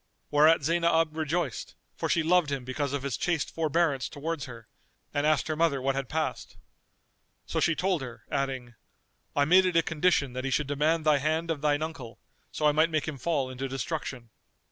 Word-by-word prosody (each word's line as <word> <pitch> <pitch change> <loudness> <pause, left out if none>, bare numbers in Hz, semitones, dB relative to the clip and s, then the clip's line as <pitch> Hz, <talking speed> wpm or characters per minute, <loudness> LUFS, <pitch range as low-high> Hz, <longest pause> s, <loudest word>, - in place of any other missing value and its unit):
Whereat 155 +1 +5
Zaynab 165 0 +2
rejoiced, 160 -4 -2 0.2
for - - -3
she 165 - +2
loved 170 -2 +3
him 135 -3 -3
because 135 +2 -2
of 140 -2 -3
his 140 -3 -2
chaste 165 -4 -1
forbearance 160 -3 +1
towards 155 0 -4
her,[FN#242] 115 -3 -10 0.5
and 145 +1 +1
asked 155 -1 +2
her 155 - -1
mother 155 -3 +2
what 135 +1 0
had 135 -2 -3
passed. 160 0 -3 0.9
So - - -2
she 165 - +2
told 185 -3 0
her, 125 -3 -8
adding, 130 -3 -2 0.6
"I 145 - +3
made 185 +4 +5
it 180 - -1
a 165 - +4
condition 150 -5 +1
that 130 0 -4
he 135 - -1
should 145 +3 +1
demand 150 +3 +1
thy 150 -2 +4
hand 160 +3 0
of 150 -3 -3
thine 150 0 +1
uncle, 125 -8 -7 0.3
so 150 - -2
I 150 - +6
might 155 +3 +3
make 155 -2 -1
him 145 -4 -5
fall 135 -2 -1
into 130 +1 -4
destruction." 130 -3 -4
150 Hz, 195 wpm, -28 LUFS, 135-165 Hz, 0.9 s, I